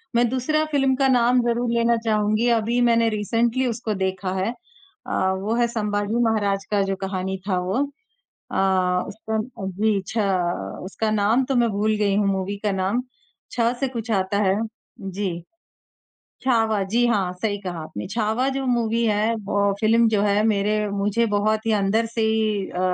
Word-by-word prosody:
मैं 240 0 +4
दूसरा 260 +5 0
फ़िल्म 270 -2 +2
का 270 0 +2
नाम 245 0 +4
ज़रूर 235 +1 0
लेना 235 0 +2
चाहूँगी, 215 +1 +1
अभी 230 +1 +1
मैंने 230 -1 +3
रिसेंटली 230 +4 0
उसको 225 -2 -2
देखा 190 0 -1
है। 190 +4 0
अ, 360 - -13 0.2
वो 205 +4 -2
है 240 0 +2
संभाजी 210 0 -1
महाराज 205 -3 0
का 205 -1 +2
जो 195 - 0
कहानी 190 0 -3
था, 185 - +2
वो। 180 +2 -2 0.8
अ, 185 -1 +1
उसका 220 +1 -4
अ, 215 -3 -5
जी, 200 +2 0
छ 225 - -5 0.7
उसका 215 +3 -2
नाम 215 +5 +2
तो 270 0 -1
मैं 240 -1 +3
भूल 215 +2 +1
गई 200 -2 +1
हूँ, 205 -1 +2
मूवी 195 +1 -1
का 205 - +2
नाम, 195 +6 0 0.5
छ 240 - -2 0.2
से 270 - 0
कुछ 230 -2 -5
आता 195 0 0
है, 190 +1 +2 0.4
जी। 190 -3 -4 1.0
छावा, 225 -5 +2
जी 235 +5 +1
हाँ, 195 -6 +1
सही 205 -2 0
कहा 180 -3 -5
आपने। 105 -9 -7
छावा 225 +3 0
जो 270 -1 -2
मूवी 235 -1 +1
है 215 +1 +1
ब 200 0 +1
फ़िल्म 225 +1 +4
जो 210 -2 +1
है 205 0 +2
मेरे 210 -1 +1 0.2
मुझे 205 +3 +1
बहुत 215 +1 0
ही 225 - +1
अंदर 210 +2 +1
से 230 0 -3
ही 220 -3 +1
अ, 180 - -5
215 Hz, 175 wpm, -23 LUFS, 200-235 Hz, 1.0 s, मैं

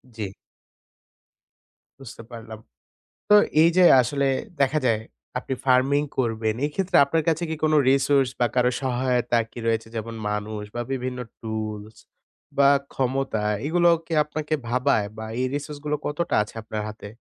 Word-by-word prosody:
জি। 110 - -4 1.8
বুঝতে 120 -3 -10
পারলাম। 110 -2 -9 0.7
তো - - +8 0.3
এই 165 - +6
যে 185 - +6 0.2
আসলে 140 +3 0 0.3
দেখা 140 +3 +3
যায় 115 -3 +2 0.4
আপনি 130 - -4
farming 135 +3 +3
করবেন, 110 -3 0
এই 145 - 0
ক্ষেত্রে 190 -1 0
আপনার 160 +3 0
কাছে 165 +1 +1
কি - - -1
কোনো 155 0 +3
resource 135 -1 +3
বা 120 - +4
কারো 125 0 +3
সহায়তা 125 -2 +1
কি - - -11
রয়েছে? 115 -1 0
যেমন 115 +1 -5 0.2
মানুষ 105 0 -4
বা 120 - -3
বিভিন্ন 130 -1 -3 0.2
tools 110 -1 -5 0.6
বা 140 -1 +6 0.2
ক্ষমতা, 130 -4 -1 0.2
এগুলো 175 +2 +3 0.2
কি - - -8
আপনাকে 150 +1 -3
ভাবায় 125 -3 +1
বা 110 - -5 0.2
এই - - +1
resource 145 0 -5
গুলো 150 0 0
কতটা 170 +4 -2
আছে 105 - -10
আপনার 110 0 -4
হাতে? 105 -1 -9
130 Hz, 150 wpm, -24 LUFS, 110-145 Hz, 1.8 s, তো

